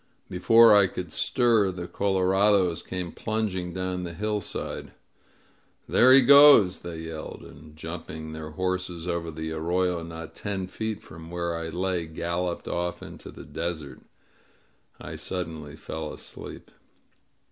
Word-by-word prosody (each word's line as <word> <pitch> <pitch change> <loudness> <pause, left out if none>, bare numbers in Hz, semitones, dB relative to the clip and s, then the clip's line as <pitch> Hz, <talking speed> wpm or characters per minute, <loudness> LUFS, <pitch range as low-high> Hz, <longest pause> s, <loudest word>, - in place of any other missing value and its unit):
Before 115 +5 +6
I 100 -2 +6
could 90 -3 -6
stir 115 - +2
the 90 -1 -5
colorados 95 -1 +2
came 90 -2 -5
plunging 105 -5 -2
down 90 0 -3
the 85 -2 -6
hillside. 105 -1 -4 0.9
^'There 130 +2 +7
he 135 - +8
goes!" 140 -8 +8
they 85 -2 -7
yelled, 80 -1 -7
and, 75 +1 -14
jumping 80 -1 -7
their 80 -1 -6
horses 90 0 -3
over 85 -1 -2
the 80 0 -5
arroyo 85 +2 0
not 80 -1 -8
ten 100 -3 -4
feet 110 +3 -5
from 80 +1 -11
where 85 -1 -2
I 85 0 -4
lay, 90 0 -2
galloped 85 +2 -3
off 90 0 -3
into - - -10
the - - -11
desert. 80 -4 -5 1.0
I - - -8
suddenly 80 -5 -5
fell 80 -1 -6
asleep. - - -9
90 Hz, 135 wpm, -26 LUFS, 80-95 Hz, 1.0 s, he